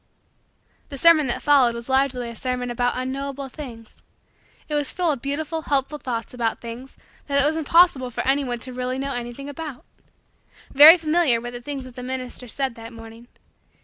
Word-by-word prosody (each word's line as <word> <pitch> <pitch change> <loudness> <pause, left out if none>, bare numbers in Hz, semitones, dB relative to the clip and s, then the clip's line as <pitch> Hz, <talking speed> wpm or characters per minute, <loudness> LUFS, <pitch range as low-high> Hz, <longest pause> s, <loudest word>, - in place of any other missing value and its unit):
The 280 - -7
sermon 315 -1 +6
that 240 - -2
followed 265 -5 +4
was 235 0 -7
largely 265 -2 +1
a - - -11
sermon 250 +1 -3
about 245 +1 0
unknowable 270 +1 -4
things. 240 -6 -11 0.7
It 300 - -6
was 290 -2 -1
full 350 -3 0
of 275 -5 -4
beautiful, 305 +4 -3
helpful, 285 0 -1
thoughts 235 -4 -5
about 235 -2 -2
things 240 +3 -9 0.3
that 280 -1 +1
it 280 - +3
was 305 +2 +1
impossible 320 -4 +3
for 245 - -4
anyone 270 -3 +1
to 255 +1 -6
really 255 +1 -3
know 275 +1 -3
anything 245 +3 -6
about. 285 -2 -8 0.9
Very 305 +5 +10
familiar 315 -6 +2
were 240 +1 -6
the 245 0 -7
things 275 +1 -5
that 255 -1 -12
the 250 - -7
minister 255 0 -5
said 265 +2 -2
that 230 0 -10
morning. 225 0 -12
260 Hz, 180 wpm, -23 LUFS, 245-285 Hz, 0.9 s, Very